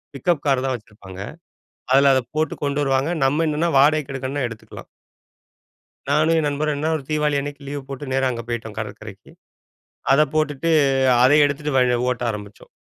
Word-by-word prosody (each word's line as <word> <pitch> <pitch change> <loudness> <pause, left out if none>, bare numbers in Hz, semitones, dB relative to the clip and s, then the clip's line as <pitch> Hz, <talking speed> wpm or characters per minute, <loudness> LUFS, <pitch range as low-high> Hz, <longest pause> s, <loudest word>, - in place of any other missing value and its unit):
Pickup 150 +3 0
car 135 -2 +2
தான் 130 -1 0
வச்சிருப்பாங்க. 100 -4 -11 0.7
அதில 135 +1 +6
அத 130 - +3 0.2
போட்டு 155 +1 0
கொண்டு 140 0 -1
வருவாங்க. 135 +3 +1
நம்ம 150 +5 +1
என்னன்னா 155 +3 0
வாடகைக்கு 145 0 +3
எடுக்கணும்னா 135 +1 -3
எடுத்துக்கலாம். 115 -2 -11 1.2
நானும் 155 +3 +3
என் 155 - 0
நண்பரும் 150 +1 -1
என்ன 155 +2 -1
ஒரு 150 - -7
தீபாவளி 150 -1 +1
அன்னைக்கு 145 0 -7
லீவு 145 0 -5
போட்டு 135 0 -7
நேரா 135 0 +1
அங்க 115 -1 -4
போய்ட்டோம் 115 -3 -5
கடற்கரைக்கு. 110 -1 -8 0.8
அத 140 - +5
போட்டுட்டு 155 +1 0 0.5
அத 130 - +6
எடுத்துட்டு 145 0 -2
வ - - +5 0.3
ஓட்ட 125 -1 -3
ஆரம்பிச்சோம். 105 -1 -10
140 Hz, 160 wpm, -21 LUFS, 125-150 Hz, 1.2 s, அதில